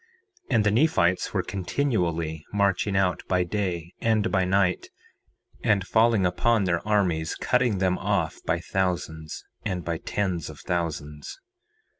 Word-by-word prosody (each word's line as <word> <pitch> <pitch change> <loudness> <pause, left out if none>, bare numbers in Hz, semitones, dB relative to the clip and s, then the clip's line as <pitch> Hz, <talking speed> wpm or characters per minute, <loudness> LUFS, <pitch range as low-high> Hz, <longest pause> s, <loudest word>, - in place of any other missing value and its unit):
4:21 - - +1
And 110 - +4
the 105 - +3
Nephites 105 - +2
were - - 0
continually 90 - -1
marching 100 0 +1
out 95 -2 +1
by 90 -1 +2
day 90 -3 -3
and 110 -1 +2
by 95 - +2
night, 90 -1 +1 0.8
and 100 -3 +2
falling 110 -2 +3
upon 105 +5 +2
their 85 -3 +1
armies, 90 -7 +1
and - - -6
cutting 125 -5 +2
them 90 -1 +1
off - - -1
by - - 0
thousands 85 -4 -3 0.2
and 90 -6 -3
by 85 -1 -2
tens 90 -6 -2
of 75 - -10
thousands. 80 - -4
95 Hz, 145 wpm, -26 LUFS, 85-105 Hz, 0.8 s, And